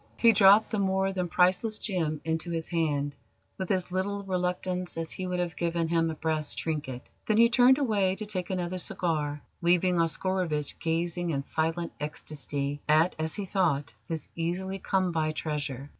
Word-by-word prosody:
He 230 - +6
dropped 205 +1 +6
the 215 - 0
more 190 0 +1
than 180 -2 -1
priceless 185 +5 +2
gem 160 -7 -2
into 160 +1 -2
his 165 -1 -2
hand 145 -4 0 0.4
with 190 - -3
as 185 -2 0
little 200 +2 -1
reluctance 180 -1 -2
as 165 -1 -3
he 185 - -4
would 180 0 -2
have 175 -3 -2
given 170 -1 -1
him 165 -1 +2
a 160 - -3
brass 155 -1 -1
trinket. 145 -6 -4 0.2
Then 215 - +3
he 235 +1 +7
turned 250 +2 +6
away 205 -9 +1
to 215 - -4
take 185 -4 -3
another 185 -1 -2
cigar, 150 -4 -2 0.2
leaving 175 +1 +3
Oscarovitch 165 -3 0
gazing 170 +1 -1
in 140 -4 -1
silent 165 +3 -1
ecstasy 145 -1 -4
at, 155 +4 +4
as 160 0 -1
he 205 - -3
thought, 170 -7 0
his 160 -3 -4
easily 185 +3 -2
come 185 -1 +1
by 155 -2 0
treasure. 145 -4 -3
175 Hz, 175 wpm, -28 LUFS, 155-190 Hz, 0.4 s, he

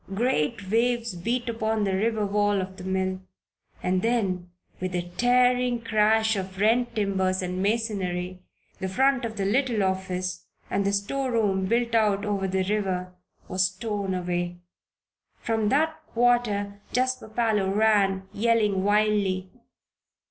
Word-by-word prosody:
Great 195 - 0
waves 235 -1 +1
beat 235 +8 -2
upon 220 -2 -1
the 195 -1 0
river 215 +2 +1
wall 205 0 +1
of 190 0 -5
the 185 - -9
mill. 190 0 -1 0.6
And 185 0 +1
then, 195 -6 0 0.3
with 185 0 -3
a 175 0 -3
tearing 245 +1 +3
crash 220 0 +3
of 190 -1 -5
rent 235 +4 +2
timbers 190 -3 0
and 180 +1 -3
masonry, 190 -4 -1 0.4
the 190 - -2
front 265 +4 +2
of 220 -1 -6
the 195 - -1
little 235 0 +1
office 185 -1 -2 0.2
and 200 0 +1
the - - +2
storeroom, 205 -2 0
built 235 +2 +1
out 210 -2 +2
over 200 -2 -1
the 190 0 0
river, 185 -2 -1 0.3
was 185 0 +2
torn 200 -1 -3
away. 175 -1 -2 0.8
From 220 -2 0
that 315 +4 +1
quarter 230 -4 +1
Jasper 255 -2 0
Parloe 215 -3 +1
ran, 195 -2 +2
yelling 210 -3 +2
wildly. 205 -3 +1
205 Hz, 135 wpm, -26 LUFS, 190-230 Hz, 0.8 s, tearing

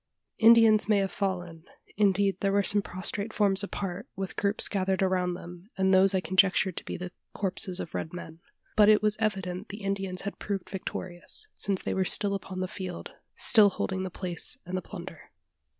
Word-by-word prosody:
Indians 225 -2 +6
may 210 - +4
have 195 -2 0
fallen: 175 -5 -4 0.3
indeed 200 -1 +2
there 195 - 0
were 200 0 +2
some 205 +1 +4
prostrate 200 +3 -3
forms 200 -2 +3
apart, 200 +2 -5
with 195 0 -5
groups 200 +1 +2
gathered 190 -1 0
around 180 -1 0
them, 175 +2 -11
and 190 0 +2
those 190 +1 +5
I 185 - +1
conjectured 185 +1 +2
to - - -4
be - - -6
the 180 0 -7 0.2
corpses 190 -1 -1
of - - -6
red 160 - -4
men. 165 -2 -9 0.4
But 210 -1 +6
it 215 0 +5
was 210 0 +2
evident 195 -2 -2
the 205 +1 -8
Indians 195 -2 -3
had 200 - -6
proved 195 -3 -4
victorious: 185 - -7
since 195 -2 +1
they - - -2
were 190 - +1
still 200 +2 +1
upon 185 -1 -5
the 185 - -1
field 185 -2 -7 0.2
still 215 -3 +6
holding 190 0 -3
the 190 - -3
place 180 +6 -5
and 180 +2 -5
the 185 - -2
plunder. - - -10
190 Hz, 190 wpm, -28 LUFS, 185-200 Hz, 0.4 s, Indians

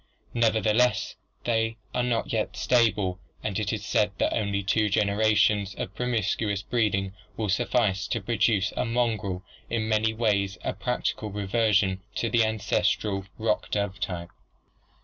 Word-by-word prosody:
Neverthe 110 -2 +2
less 125 +1 +2 0.3
they 115 -1 0 0.2
are 125 - +1
not 120 -2 -1
yet 110 -1 -1
stable 105 -7 +2 0.2
and 105 -1 -1
it 105 -1 -1
is 105 -2 -3
said 105 -1 +2
that - - +1
only 100 -3 0
two 105 +2 +2
generations 105 -1 +2
of 95 - -5
promiscuous 105 -3 -1
breeding 100 -5 0 0.2
will 110 -2 -1
suffice 105 -2 +1
to 115 - -1
produce 105 -2 +1
a - - 0
mongrel 110 -6 -1 0.3
in 110 -2 -1
many 110 0 +2
ways 100 -4 0
a - - -1
practical 110 - -2
reversion 100 -1 +1
to 115 - -1
the 115 0 +4
ancestral 105 -2 0
rock 110 +1 0
dove 100 -2 -1
type. 85 -2 -4
105 Hz, 145 wpm, -27 LUFS, 100-115 Hz, 0.3 s, the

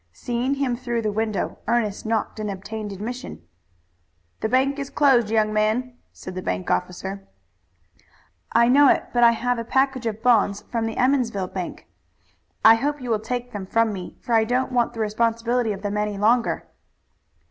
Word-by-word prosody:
Seeing 245 - -2
him 270 -3 0
through 240 -2 -3
the 215 - 0
window, 215 -1 -2
Ernest 220 -3 0
knocked 220 0 -1
and 210 -1 -3
obtained 205 +2 -6
admission. 210 - -6 1.0
"The 220 - -1
bank 270 +3 +2
is 275 -1 -4
closed, 265 -6 +3
young 215 -1 +2
man," 220 +4 0 0.2
said 185 - -9
the 185 - -5
bank 90 - -2
officer. 190 - -3 1.2
"I 235 0 +4
know 275 +2 +6
it, - - +3
but 240 -1 +3
I 235 0 +7
have 245 +1 -1
a - - -3
package 265 0 0
of 220 0 -4
bonds 210 -4 +3
from 230 -2 -1
the 225 - -4
bank - - -11
in - - +2
Emmonsville. 235 -8 +1 1.1
I 220 - +10
hope 285 +6 -1
you 250 -2 -4
will 220 - +2
take 245 +3 -4
them 195 -2 -5
from 230 +1 +2
me, 185 -2 -8
for 240 - -3
I 225 -1 +5
don't 250 +4 0
want 240 -2 +1
the - - -7
responsibility 230 +2 0
of 200 0 -6
them 205 0 -2
any 210 -1 -1
longer." 230 +4 +1
230 Hz, 180 wpm, -23 LUFS, 210-245 Hz, 1.2 s, I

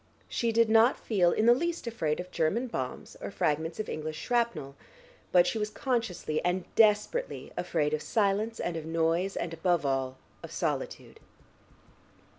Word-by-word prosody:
She 235 -1 0
did 230 0 +4
not 225 +3 +5
feel 180 -6 +2
in 215 - +1
the 240 - +8
least 340 +5 -2
afraid 165 -10 -1
of 180 0 -6
German 195 +11 +1
bombs 130 - -5
or - - -4
fragments 160 -2 -1
of 215 - -2
English 155 0 -4
shrapnel, 235 - -1 0.6
but 175 -1 +6
she 225 - -1
was 210 0 -1
consciously 220 - -2
and 180 0 0
desperately 220 - +2
afraid 150 0 0
of 155 - 0
silence 215 +3 0
and 175 - -2
of 160 - -4
noise 165 +4 0
and 170 -1 -3
above 170 -1 +1
all 135 -1 -1 0.2
of - - -8
solitude. - - -3
185 Hz, 160 wpm, -29 LUFS, 160-230 Hz, 0.6 s, the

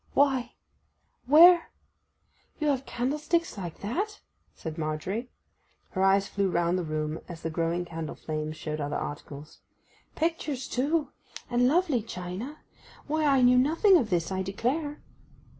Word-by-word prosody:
'Why—where—you 295 +5 +1
have 270 -1 -1
candlesticks 300 +7 -1
like 175 -5 -7
that?' 395 - -3 0.4
said 160 -2 -6
Margery. 170 +10 -3 0.6
Her 190 - -2
eyes 195 +1 +4
flew 200 -1 0
round 175 0 +1
the - - -2
room 155 0 -3
as 170 -2 -9
the 165 - -2
growing 165 +2 -1
candle 165 -2 -6
flames 155 0 -4
showed 155 -1 -4
other 145 0 -2
articles. 145 +1 -7 0.6
'Pictures 310 -5 -2
too—and 255 -3 -1
lovely 310 -4 +2
china—why 230 - -6
I 270 -2 +4
knew 250 0 +6
nothing 330 +9 +4
of 245 -11 +3
this, 170 -1 0
I 190 0 -1
declare. 265 - -2
230 Hz, 125 wpm, -28 LUFS, -, 0.6 s, knew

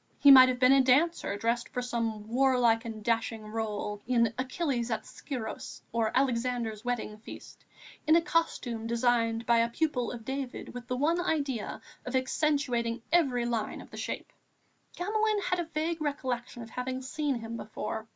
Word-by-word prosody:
He 285 - +8
might 260 -1 +10
have 250 - 0
been 255 0 +6
a 270 0 +7
dancer 265 -4 +2
dressed 235 +3 -1
for 250 - -3
some 225 -3 -2
warlike 245 -1 +3
and 220 -2 -6
dashing 225 -1 0
rôle, 210 -1 -3
in 235 -3 +3
Achilles 255 -2 -1
at 225 - -2
Scyros 245 -6 -6
or 225 -1 +1
Alexander's 240 -4 0
Wedding 240 -3 -3
feast, 225 - -11 0.4
in 315 - +6
a 335 - +5
costume 245 -10 -1
designed 230 -1 +1
by 235 -1 +4
a 230 0 +2
pupil 250 -3 -1
of 230 -3 -8
David 265 -1 -5
with 245 0 -8
the 250 - -2
one 330 +6 +2
idea 280 - -2 0.2
of 250 - -4
accentuating 255 -4 0
every 270 -8 +3
line 230 -3 -2
of - - -12
the - - -9
shape. - - -5 0.6
Gamelin 430 +3 +1
had 360 0 0
a 345 - -1
vague 320 +1 -2
recollection 255 -5 -3
of 225 - -12
having 255 +1 -4
seen 285 +1 -1
him 230 0 -5
before. 220 0 -5
245 Hz, 170 wpm, -29 LUFS, 230-275 Hz, 0.6 s, might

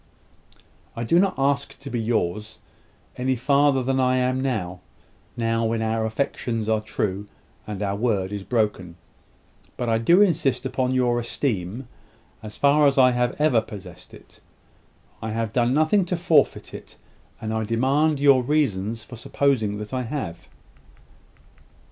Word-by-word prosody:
"I 115 - -3
do 165 +9 +3
not 195 0 +2
ask 140 +1 0
to 140 - -9
be 120 - -2
yours, 110 -2 -2 0.6
any 130 +1 0
farther 140 +1 +2
than 135 +1 0
I 130 0 +2
am 130 +1 0
now 95 -9 -2 0.6
now 115 0 0
when 110 0 -1
our 110 0 0
affections 115 -2 -2
are 110 -1 +1
true, 100 -2 -3 0.4
and 105 -1 -4
our 100 -1 -1
word 100 -4 -1
is 100 -1 -5
broken. 105 -7 -1 0.8
But 120 -2 -2
I 115 0 +2
do 170 +11 +4
insist 150 -8 0
upon 130 0 -1
your 120 -2 +2
esteem, 115 -2 -3 0.5
as 105 -1 -9
far 145 +1 +4
as 140 - +1
I 130 -1 +6
have 125 0 0
ever 150 -7 +3
possessed 95 -5 -11
it. - - -16 0.8
I 110 - -4
have 115 -1 -2
done 120 -1 +2
nothing 155 +8 +3
to 180 0 -2
forfeit 160 -4 +2
it; - - -11 0.4
and 110 0 -4
I 110 0 -1
demand 135 +7 +1
your 140 -2 +5
reasons 115 -6 -1
for 120 - -11
supposing 115 -4 0
that 105 +2 -7
I 130 - -1
have." 120 - -5
120 Hz, 155 wpm, -23 LUFS, 110-135 Hz, 0.8 s, I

